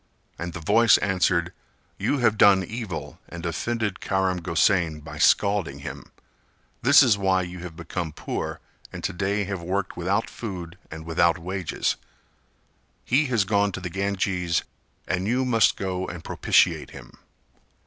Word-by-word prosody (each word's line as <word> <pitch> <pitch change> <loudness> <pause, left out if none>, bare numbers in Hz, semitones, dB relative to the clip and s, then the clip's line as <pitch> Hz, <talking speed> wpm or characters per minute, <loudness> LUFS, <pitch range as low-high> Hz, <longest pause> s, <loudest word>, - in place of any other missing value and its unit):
And 85 0 -4
the - - -6
voice 105 +7 +5
answered 90 -3 +1 0.5
"You 145 - +1
have 120 -4 +3
done 100 -2 +6
evil 90 -10 -6
and 85 0 -7
offended 105 +4 -2
Karam 95 -2 0
Gosain 85 -1 +1
by 75 -1 -9
scalding 95 -7 +2
him; - - -8 0.7
this 140 +4 +7
is 110 -6 +3
why 95 -1 +2
you 90 0 -7
have 85 -2 -8
become 85 -1 -4
poor - - -4 0.3
and - - -8
to - - -1
day 100 +3 0
have 100 -2 -4
worked 95 +3 -2
without 95 +6 0
food 90 -5 -7
and 80 0 -8
without 85 +1 +2
wages; 90 +1 -2 1.1
he 140 +4 +2
has 120 -5 +2
gone 100 0 +1
to - - -4
the 90 -1 -6
Ganges 95 -3 -1 0.4
and 95 +1 -1
you 125 +3 +1
must 115 -4 +3
go 95 -1 -3
and 85 -2 -7
propitiate - - +2
him." - - -13
95 Hz, 150 wpm, -25 LUFS, 85-100 Hz, 1.1 s, this